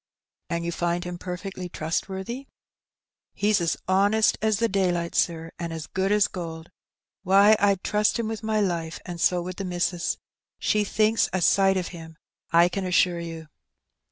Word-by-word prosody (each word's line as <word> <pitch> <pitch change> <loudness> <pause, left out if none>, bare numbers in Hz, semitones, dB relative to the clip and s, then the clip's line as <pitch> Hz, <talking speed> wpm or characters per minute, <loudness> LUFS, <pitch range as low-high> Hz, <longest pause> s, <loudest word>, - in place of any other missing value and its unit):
"And 170 -1 -2
you 170 - -1
find 175 +1 -1
him 175 -1 -6
perfectly 180 0 -6
trustworthy?'' 190 - -4 0.9
"He's 205 -2 +2
as 170 - 0
honest 200 +3 +3
as 220 -1 +2
the 230 +2 +2
daylight, 180 -4 0
sir, 165 -1 0
and 170 -1 -4
as 160 -1 -5
good 190 +1 -1
as 210 -2 +4
gold.. 165 -2 -7 0.5
Why, 200 +3 +6
I'd 200 -2 +2
trust 210 +2 +2
him 230 -2 -2
with 225 0 -4
my 220 -1 0
life, 170 -4 -2
and 175 -2 -6
so 180 -1 +2
would 185 0 -6
the 195 - -3
missus. 175 -1 -1 0.4
She 210 0 +1
thinks 215 +2 +2
a 185 - +1
sight 195 +2 +4
of 180 - -2
him, 160 -2 -11 0.3
I 170 +1 +6
can 190 +2 -3
assure 180 -1 +2
you." 165 -2 -7
185 Hz, 170 wpm, -25 LUFS, 170-200 Hz, 0.9 s, Why